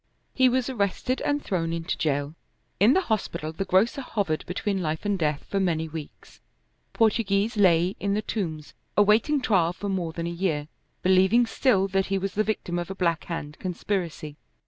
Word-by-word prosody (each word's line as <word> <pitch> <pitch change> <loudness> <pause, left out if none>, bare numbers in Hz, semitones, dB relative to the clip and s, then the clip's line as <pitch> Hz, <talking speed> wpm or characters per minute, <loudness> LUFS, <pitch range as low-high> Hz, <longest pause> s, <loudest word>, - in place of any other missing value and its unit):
He 260 -1 +4
was 255 0 0
arrested 250 +1 -1
and 290 0 0
thrown 165 -4 -1
into 165 +1 -2
jail. 145 -3 -1 0.5
In 215 +7 +6
the 380 - +3
hospital 180 - -2
the 195 +5 -4
grocer 210 +9 +2
hovered 200 -11 -2
between 195 +2 -2
life 160 +2 -3
and 205 -1 +1
death 150 -3 -1
for 200 - -1
many 165 -4 0
weeks. 155 -1 -10 0.5
Portoghese 215 -1 +1
lay 180 -2 +4
in 200 0 0
the 215 - -1
Tombs 160 -10 -4 0.2
awaiting 215 +8 +4
trial 180 -8 +2
for 200 +2 -5
more 180 -4 -1
than 165 0 -4
a 170 - -2
year, 170 -4 -1 0.4
believing 190 +6 +5
still 225 -4 +2
that 195 0 +1
he 195 - 0
was 195 +1 -3
the 215 - +1
victim 185 -5 -2
of 175 - -5
a 195 - -5
Black 170 -4 0
Hand 150 -3 -6
conspiracy. 175 -5 -3
190 Hz, 180 wpm, -26 LUFS, 165-210 Hz, 0.5 s, In